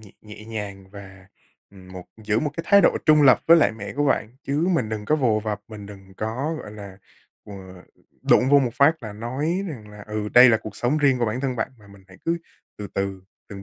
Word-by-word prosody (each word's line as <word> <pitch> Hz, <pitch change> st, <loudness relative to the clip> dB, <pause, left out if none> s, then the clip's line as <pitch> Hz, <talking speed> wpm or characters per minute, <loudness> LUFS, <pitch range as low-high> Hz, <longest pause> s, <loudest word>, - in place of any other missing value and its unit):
nhẹ 105 Hz, -3 st, -16 dB
nhẹ 105 Hz, 0 st, -12 dB
nhàng 100 Hz, -4 st, -7 dB
và, 95 Hz, -2 st, -13 dB, 0.4 s
ừm, 95 Hz, -2 st, -15 dB
một 90 Hz, -1 st, -9 dB, 0.2 s
giữ 105 Hz, +1 st, +1 dB
một 150 Hz, -, -2 dB
cái 165 Hz, -, -4 dB
thái 200 Hz, 0 st, +6 dB
độ -, -, +3 dB
trung 155 Hz, -1 st, +6 dB
lập 130 Hz, -3 st, +6 dB
với 170 Hz, +1 st, +8 dB
lại 145 Hz, -, +3 dB
mẹ 105 Hz, -2 st, -8 dB
của 145 Hz, -, +1 dB
bạn, 115 Hz, -5 st, 0 dB
chứ 150 Hz, +5 st, -1 dB
mình 130 Hz, -10 st, 0 dB
đừng 105 Hz, -1 st, -5 dB
có 155 Hz, -, +1 dB
vồ 115 Hz, -7 st, +1 dB
vập, 105 Hz, -1 st, -4 dB
mình 105 Hz, -2 st, -10 dB
đừng 95 Hz, -2 st, -14 dB
có, 125 Hz, +9 st, -3 dB
gọi 105 Hz, -, -10 dB
là, 100 Hz, -2 st, -11 dB, 0.5 s
ờ, 105 Hz, -, -11 dB, 0.7 s
đụng 130 Hz, -, +3 dB
vô 145 Hz, -, +7 dB
một 125 Hz, -3 st, -1 dB
phát 140 Hz, +2 st, +3 dB
là 110 Hz, -2 st, -7 dB
nói 140 Hz, -, -3 dB
rằng 110 Hz, -8 st, -9 dB
là: 105 Hz, -1 st, -12 dB
ừ, 105 Hz, 0 st, -4 dB
đây 125 Hz, +1 st, +9 dB
là 110 Hz, -, +4 dB
cuộc 110 Hz, -2 st, -10 dB
sống 125 Hz, +7 st, 0 dB
riêng 135 Hz, -3 st, +2 dB
của 120 Hz, -, +1 dB
bản 110 Hz, +4 st, -3 dB
thân 130 Hz, -3 st, -2 dB
bạn, -, -, -2 dB
mà 105 Hz, -, -19 dB
mình 100 Hz, -1 st, -17 dB
hãy 95 Hz, -, -16 dB
cứ 170 Hz, +1 st, 0 dB, 0.4 s
từ 105 Hz, -, -7 dB
từ, 95 Hz, -1 st, -3 dB, 0.3 s
từng 100 Hz, -1 st, -9 dB
110 Hz, 240 wpm, -23 LUFS, 100-140 Hz, 0.7 s, đây